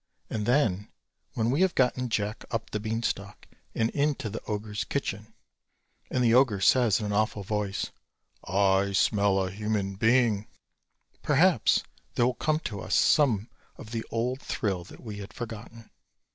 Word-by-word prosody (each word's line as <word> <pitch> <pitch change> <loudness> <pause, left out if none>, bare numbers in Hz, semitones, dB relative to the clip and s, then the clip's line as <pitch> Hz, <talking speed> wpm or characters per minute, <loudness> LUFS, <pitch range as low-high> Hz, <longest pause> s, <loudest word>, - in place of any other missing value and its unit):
And 105 -1 -2
then 110 -7 +2 0.5
when 115 +1 +1
we 145 +7 +1
have 190 -1 +3
gotten 125 -1 +1
Jack 105 -1 -2
up 115 -1 -3
the 105 - -2
beanstalk 110 -2 -3 0.3
and 115 +1 +1
into 145 -6 0
the 110 - -5
ogre's 105 0 -3
kitchen, 110 -5 -4 0.7
and 125 - 0
the 115 -1 +4
ogre 120 -5 +4
says 115 +2 +4
in 110 - -3
an 105 - -2
awful 105 -1 0
voice 105 0 -2 0.5
"I 100 +1 +2
smell 100 0 +3
a 95 -1 -1
human 105 -1 -2
being," 110 -2 +3 0.7
perhaps - - +3 0.3
there 120 - +3
will 125 - +2
come 155 +5 0
to 105 -8 -5
us - - -1
some 120 -8 +3 0.3
of 115 -6 -11
the 115 -1 -3
old 125 +4 -1
thrill 95 -8 -2
that - - -14
we 105 -3 -6
had 100 +1 -9
forgotten. 115 -1 -8
110 Hz, 160 wpm, -28 LUFS, 100-120 Hz, 0.7 s, the